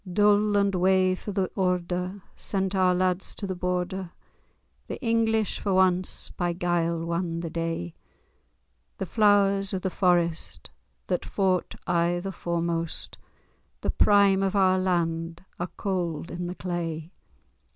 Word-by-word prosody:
Dool 205 Hz, +1 st, +4 dB
and 200 Hz, -1 st, +2 dB
wae 185 Hz, 0 st, +3 dB
for 195 Hz, +3 st, -5 dB
the 190 Hz, -2 st, -1 dB
order, 180 Hz, +1 st, -1 dB
sent 195 Hz, -1 st, -1 dB
our 185 Hz, -1 st, +3 dB
lads 185 Hz, 0 st, 0 dB
to 205 Hz, -, -5 dB
the 190 Hz, -, -2 dB
Border! 180 Hz, 0 st, -2 dB, 0.8 s
The -, -, -5 dB
English, 225 Hz, -3 st, +1 dB
for 190 Hz, -2 st, +1 dB
ance, 185 Hz, -1 st, +1 dB
by 175 Hz, -1 st, -1 dB
guile 170 Hz, -1 st, 0 dB
wan 170 Hz, 0 st, -2 dB
the 165 Hz, -2 st, -5 dB
day: 165 Hz, -, -3 dB, 1.0 s
The 190 Hz, -, -3 dB
Flowers 200 Hz, -1 st, +3 dB
of 185 Hz, -, -4 dB
the 190 Hz, -, -1 dB
Forest, 175 Hz, -3 st, 0 dB, 0.3 s
that -, -, -1 dB
fought 185 Hz, -3 st, 0 dB
aye 175 Hz, 0 st, +1 dB
the 195 Hz, +2 st, -4 dB
foremost, 170 Hz, -2 st, -3 dB, 0.6 s
The -, -, 0 dB
prime 200 Hz, -2 st, +4 dB
of 195 Hz, +1 st, 0 dB
our 185 Hz, -1 st, +4 dB
land, 170 Hz, -1 st, -1 dB
are 175 Hz, 0 st, -2 dB
cauld 175 Hz, -5 st, -2 dB
in 175 Hz, 0 st, -4 dB
the 180 Hz, -, -5 dB
clay. 170 Hz, -3 st, -4 dB
180 Hz, 140 wpm, -26 LUFS, 170-195 Hz, 1.0 s, Dool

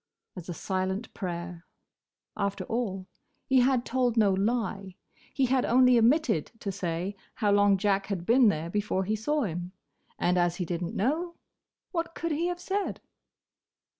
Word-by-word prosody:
as 180 Hz, -2 st, -9 dB
a -, -, -2 dB
silent 190 Hz, +5 st, -3 dB
prayer. 175 Hz, -2 st, -5 dB, 0.7 s
After 200 Hz, -1 st, -2 dB
all, 205 Hz, -6 st, -3 dB, 0.4 s
he 265 Hz, -1 st, +4 dB
had 250 Hz, -1 st, +3 dB
told 245 Hz, -2 st, 0 dB
no 210 Hz, -3 st, +5 dB
lie. 195 Hz, -2 st, -1 dB, 0.4 s
He 270 Hz, -, +1 dB
had 255 Hz, 0 st, +2 dB
only 250 Hz, +1 st, +5 dB
omitted 235 Hz, -, +3 dB
to 200 Hz, -, -2 dB
say 180 Hz, +1 st, -3 dB, 0.2 s
how 210 Hz, -3 st, +1 dB
long 205 Hz, -1 st, +5 dB
Jack 195 Hz, 0 st, +1 dB
had 190 Hz, -4 st, -3 dB
been 240 Hz, +2 st, +5 dB
there 165 Hz, -2 st, -2 dB
before 205 Hz, -2 st, 0 dB
he 210 Hz, +3 st, -1 dB
saw 295 Hz, +7 st, 0 dB
him. 175 Hz, -2 st, -4 dB, 0.4 s
And 180 Hz, +1 st, +2 dB
as 175 Hz, -1 st, +2 dB
he 180 Hz, -, -3 dB
did 170 Hz, +1 st, -3 dB
n't 170 Hz, -, -4 dB
know, 325 Hz, -, -1 dB, 0.6 s
what 335 Hz, -2 st, -3 dB
could 335 Hz, -, -3 dB
he 325 Hz, +3 st, 0 dB
have 355 Hz, 0 st, -3 dB
said? 390 Hz, +3 st, -2 dB
205 Hz, 165 wpm, -28 LUFS, 185-250 Hz, 0.7 s, no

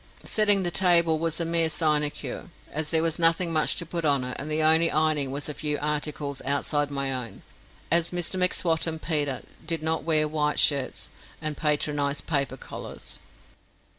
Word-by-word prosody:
Setting 205 Hz, -3 st, +3 dB
the 175 Hz, -, -2 dB
table 170 Hz, -4 st, +3 dB
was 165 Hz, 0 st, -1 dB
a 170 Hz, -, -1 dB
mere 165 Hz, -1 st, +1 dB
sinecure, 150 Hz, -2 st, -1 dB, 0.3 s
as 155 Hz, 0 st, -3 dB
there 160 Hz, -1 st, +2 dB
was 165 Hz, 0 st, 0 dB
nothing 165 Hz, +1 st, +3 dB
much 155 Hz, -1 st, +2 dB
to 170 Hz, -, -3 dB
put 170 Hz, 0 st, -4 dB
on 140 Hz, -4 st, +2 dB
it; 125 Hz, 0 st, -4 dB
and 150 Hz, -, -6 dB
the 155 Hz, +1 st, 0 dB
only 160 Hz, +1 st, +5 dB
ironing 155 Hz, -3 st, +1 dB
was 140 Hz, +2 st, -3 dB
a 150 Hz, -, -4 dB
few 150 Hz, 0 st, -2 dB
articles 150 Hz, -2 st, -3 dB
outside 145 Hz, +2 st, 0 dB
my 140 Hz, -1 st, -2 dB
own, 125 Hz, -3 st, -6 dB, 0.5 s
as 170 Hz, 0 st, +4 dB
Mr 175 Hz, +1 st, -1 dB
M'Swat 175 Hz, -2 st, +1 dB
and 160 Hz, -1 st, -3 dB
Peter 145 Hz, -5 st, -1 dB, 0.2 s
did 160 Hz, -1 st, -1 dB
not 160 Hz, 0 st, 0 dB
wear 155 Hz, -2 st, +3 dB
white 150 Hz, -1 st, -1 dB
shirts, 140 Hz, -3 st, +1 dB, 0.3 s
and 155 Hz, -2 st, -3 dB
patronised 145 Hz, -1 st, 0 dB
paper 140 Hz, -4 st, -1 dB
collars. -, -, -9 dB
155 Hz, 175 wpm, -26 LUFS, 145-165 Hz, 0.5 s, only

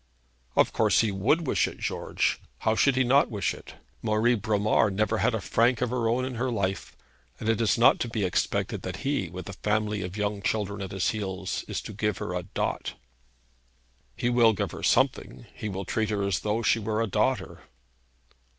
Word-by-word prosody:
'Of -, -, +3 dB
course -, -, +3 dB
he 110 Hz, -2 st, 0 dB
would 120 Hz, -, +1 dB
wish -, -, +2 dB
it, -, -, -8 dB
George. -, -, -1 dB, 0.2 s
How 110 Hz, -, +2 dB
should 135 Hz, +4 st, +3 dB
he 130 Hz, -, +3 dB
not 135 Hz, +3 st, +4 dB
wish 105 Hz, -5 st, -1 dB
it? -, -, -12 dB, 0.3 s
Marie 110 Hz, +2 st, +2 dB
Bromar 105 Hz, 0 st, +2 dB
never 110 Hz, +3 st, 0 dB
had 120 Hz, 0 st, +2 dB
a -, -, -1 dB
franc 115 Hz, +4 st, +2 dB
of 125 Hz, -1 st, -1 dB
her 120 Hz, -3 st, 0 dB
own 125 Hz, +2 st, +1 dB
in 130 Hz, -, -4 dB
her 130 Hz, -, +1 dB
life, 95 Hz, -5 st, -2 dB, 0.4 s
and -, -, -5 dB
it 115 Hz, 0 st, +2 dB
is 105 Hz, -5 st, +2 dB
not 120 Hz, -, +5 dB
to -, -, -1 dB
be 110 Hz, -3 st, -2 dB
expected 90 Hz, -, -1 dB
that -, -, -6 dB
he, 135 Hz, -, 0 dB
with 90 Hz, +2 st, -8 dB
a 100 Hz, -, -6 dB
family 105 Hz, +1 st, -1 dB
of 90 Hz, +3 st, -5 dB
young 105 Hz, -1 st, -1 dB
children 100 Hz, -1 st, -1 dB
at 95 Hz, -, -4 dB
his 95 Hz, -1 st, 0 dB
heels, 95 Hz, -3 st, -3 dB
is -, -, -3 dB
to -, -, -7 dB
give 105 Hz, -1 st, -1 dB
her 90 Hz, -, -4 dB
a 90 Hz, -, -1 dB
dot.' 90 Hz, -, -3 dB, 1.2 s
'He -, -, -1 dB
will 120 Hz, -2 st, +5 dB
give -, -, -2 dB
her -, -, -8 dB
something. -, -, +1 dB
He 110 Hz, -, -5 dB
will 95 Hz, 0 st, -4 dB
treat 110 Hz, +2 st, -1 dB
her 105 Hz, -2 st, -1 dB
as 100 Hz, -2 st, 0 dB
though 110 Hz, +2 st, -1 dB
she 115 Hz, -, +3 dB
were 110 Hz, 0 st, -2 dB
a 115 Hz, -, +2 dB
daughter.' 110 Hz, +5 st, -1 dB
110 Hz, 205 wpm, -27 LUFS, 100-115 Hz, 1.2 s, not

